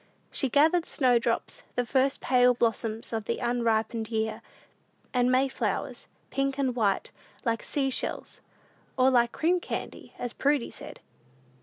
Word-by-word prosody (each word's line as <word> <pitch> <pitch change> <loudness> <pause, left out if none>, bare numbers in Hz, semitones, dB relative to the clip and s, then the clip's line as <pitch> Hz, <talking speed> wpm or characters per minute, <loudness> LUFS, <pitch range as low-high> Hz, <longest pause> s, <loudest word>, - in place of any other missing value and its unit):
She 270 - +1
gathered 315 +6 +3
snowdrops, 245 -4 +1
"the 245 - 0
first 265 +2 +1
pale 250 -1 +4
blossoms 225 -1 -1
of 220 -2 -2
the - - -1
unripened 230 -2 0
year," 220 -1 -2 0.7
and 250 0 +3
May 260 +2 +4
flowers, 265 - -3 0.2
pink 275 0 0
and 265 -3 0
white, 205 -5 0 0.3
like 230 -1 0
sea 270 -2 -1
shells, - - -3 0.6
or 260 0 +5
like 240 -2 +3
"cream 350 +3 +1
candy," - - -6
as 245 - -4
Prudy 285 -3 +1
said. - - -10
245 Hz, 140 wpm, -28 LUFS, 230-270 Hz, 0.7 s, or